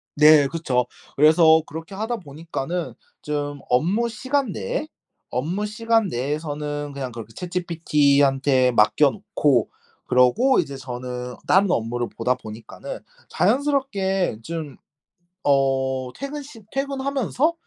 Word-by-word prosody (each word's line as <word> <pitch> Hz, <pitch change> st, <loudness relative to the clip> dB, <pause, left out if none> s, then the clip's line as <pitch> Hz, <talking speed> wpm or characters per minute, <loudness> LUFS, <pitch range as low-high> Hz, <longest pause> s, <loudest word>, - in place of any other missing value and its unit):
네 150 Hz, -1 st, +7 dB
그쵸. 135 Hz, -6 st, 0 dB, 0.3 s
그래서 160 Hz, +2 st, +6 dB
그렇게 160 Hz, +5 st, -8 dB
하다 225 Hz, +4 st, -2 dB
보니까는 165 Hz, +1 st, -5 dB, 0.3 s
좀 145 Hz, -1 st, -3 dB
업무 185 Hz, -, +2 dB
시간 260 Hz, +2 st, -1 dB
내에 95 Hz, -, -3 dB, 0.4 s
업무 165 Hz, -, -2 dB
시간 225 Hz, 0 st, +1 dB
내에서는 145 Hz, +1 st, -3 dB
그냥 135 Hz, -3 st, -5 dB
그렇게 115 Hz, -1 st, -9 dB
ChatGPT한테 145 Hz, -7 st, +2 dB
맡겨놓고 145 Hz, -, +2 dB, 0.4 s
그러고 125 Hz, -, +4 dB
이제 140 Hz, -1 st, -2 dB
저는 125 Hz, -1 st, -6 dB
다른 190 Hz, 0 st, +4 dB
업무를 120 Hz, -2 st, -1 dB
보다 125 Hz, +2 st, +1 dB
보니까는 110 Hz, -2 st, -9 dB, 0.3 s
자연스럽게 200 Hz, -, +1 dB
좀 155 Hz, -2 st, -6 dB, 0.7 s
어 130 Hz, -2 st, +1 dB
퇴근 285 Hz, +1 st, -6 dB
시 265 Hz, -6 st, -13 dB
퇴근하면서 275 Hz, +2 st, 0 dB
150 Hz, 275 characters per minute, -23 LUFS, 130-205 Hz, 0.7 s, 네